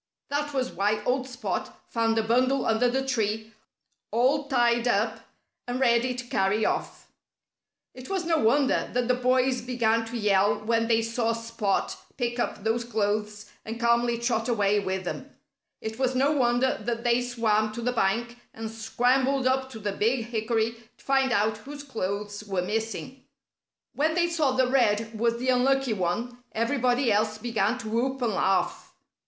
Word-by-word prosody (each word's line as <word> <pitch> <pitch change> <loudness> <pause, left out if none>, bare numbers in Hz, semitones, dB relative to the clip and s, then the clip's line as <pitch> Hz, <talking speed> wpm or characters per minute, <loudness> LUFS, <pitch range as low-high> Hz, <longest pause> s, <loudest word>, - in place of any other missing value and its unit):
That 290 +1 -1
was 260 -2 -1
why 210 +1 0
old 260 +2 0
Spot 250 +1 -4
found 225 -1 0
a 225 - +2
bundle 255 +4 +2
under 225 +2 +2
the 265 +2 -1
tree, 220 -3 -1 0.6
all 270 +5 +2
tied 240 -3 +2
up 220 0 +1 0.5
and 245 +1 -2
ready 250 0 +2
to 250 0 -6
carry 205 -1 +1
off. - - -3 0.8
It 255 0 -11
was 380 -3 -1
no 325 -1 +2
wonder 265 +4 +2
that 245 -1 0
the 250 - +3
boys 255 0 +2
began 230 -2 +1
to 235 +1 -5
yell 205 -2 +3
when 230 0 +1
they 225 -1 +3
saw 230 0 0
Spot 230 -3 -2 0.2
pick 240 -2 -2
up 210 - -2
those 225 +2 0
clothes 210 -2 -2
and 225 +1 -6
calmly 235 0 +2
trot 235 -1 -1
away 205 -3 +2
with 190 -1 -2
them. 180 - -6 0.5
It 220 +2 -5
was 260 -1 +1
no 275 +3 +3
wonder 255 -2 +2
that 235 +1 -3
they 240 0 +3
swam 220 -3 +1
to 235 - -5
the 250 - +1
bank 235 +3 0 0.2
and 220 0 -5
scrambled 255 +4 +1
up 260 0 +1
to 245 - -9
the 205 -1 -3
big 225 +4 0
hickory 230 0 -1 0.2
to - - -22
find 270 -1 +2
out 215 -1 +1
whose 285 +5 -9
clothes 205 -5 -4
were 190 -3 -1
missing. 225 +6 -4 0.7
When 315 +2 +1
they 345 -1 +2
saw 310 -6 +1
that 260 -1 +2
Red 225 -3 +1
was 235 0 +1
the 255 +2 -2
unlucky 260 0 +2
one, 235 +7 -3
everybody 245 +1 +1
else 215 +1 +1
began 225 0 0
to 225 -3 -6
whoop 260 +4 0
and 225 -3 +1
laugh. 195 0 0
235 Hz, 170 wpm, -26 LUFS, 220-255 Hz, 0.8 s, the